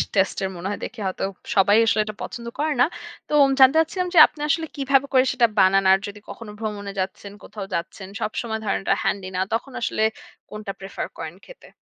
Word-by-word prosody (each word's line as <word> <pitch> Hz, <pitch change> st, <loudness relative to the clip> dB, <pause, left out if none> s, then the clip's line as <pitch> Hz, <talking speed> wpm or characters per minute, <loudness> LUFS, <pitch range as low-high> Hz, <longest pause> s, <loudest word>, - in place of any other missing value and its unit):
Test 195 Hz, -1 st, +2 dB
এর 190 Hz, -, -1 dB
মনে 175 Hz, +2 st, -5 dB
হয় 205 Hz, -, -4 dB
দেখে 225 Hz, 0 st, -8 dB
হয়তো 185 Hz, -, -4 dB, 0.3 s
সবাই 200 Hz, +2 st, +5 dB
আসলে 220 Hz, -1 st, +2 dB
এটা 215 Hz, -, -6 dB
পছন্দ 235 Hz, -1 st, -7 dB
করে 305 Hz, +1 st, +1 dB
না। -, -, +7 dB, 0.4 s
তো -, -, -4 dB, 0.3 s
জানতে 265 Hz, +2 st, +7 dB
চাচ্ছিলাম 360 Hz, +3 st, 0 dB
যে, -, -, 0 dB
আপনি 295 Hz, -, -13 dB
আসলে 325 Hz, +2 st, +1 dB
কিভাবে 275 Hz, -1 st, +2 dB
করে 255 Hz, -1 st, +6 dB
সেটা 245 Hz, -3 st, +3 dB
বানান? 195 Hz, +1 st, +4 dB
আর 190 Hz, -, +5 dB
যদি 205 Hz, +1 st, -9 dB
কখনো 225 Hz, -2 st, -9 dB
ভ্রমণে 205 Hz, -2 st, -4 dB
যাচ্ছেন, 190 Hz, +1 st, -4 dB
কোথাও 205 Hz, -3 st, -7 dB
যাচ্ছেন, 190 Hz, +3 st, -5 dB
সবসময় 220 Hz, +1 st, -3 dB
ধরেন 200 Hz, -, 0 dB
ওটা -, -, +2 dB
হ্যান্ডি 195 Hz, -2 st, -1 dB
না। 185 Hz, -, 0 dB
তখন 240 Hz, +4 st, -2 dB
আসলে 220 Hz, -, 0 dB, 0.5 s
কোনটা 210 Hz, -1 st, -6 dB
প্রেফার 195 Hz, 0 st, -5 dB
করেন -, -, -6 dB
খেতে? -, -, -15 dB
215 Hz, 205 wpm, -23 LUFS, 195-260 Hz, 0.5 s, না